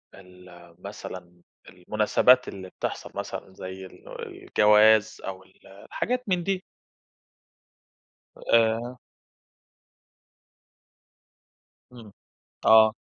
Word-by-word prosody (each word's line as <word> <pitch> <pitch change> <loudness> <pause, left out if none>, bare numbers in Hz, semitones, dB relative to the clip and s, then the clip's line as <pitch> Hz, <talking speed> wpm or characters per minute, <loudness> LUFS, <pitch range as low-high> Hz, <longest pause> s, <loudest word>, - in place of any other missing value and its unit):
ال 90 -2 -16
مثلًا 90 -3 -10 0.3
المناسبات 110 +7 +2
اللي 95 -1 -8
بتحصل - - -6
مثلًا 95 - -6
زي 95 0 -8
ال 95 - -12
الجواز 105 +1 +3
أو 95 -1 -7
ال 95 - -23
الحاجات 245 - -4
من 180 -2 +1
دي. 190 0 -2 1.7
آآ 115 +2 +1 2.9
امم، 115 -4 -13 0.5
آه. 110 0 +7
105 Hz, 80 wpm, -25 LUFS, 95-115 Hz, 2.9 s, آه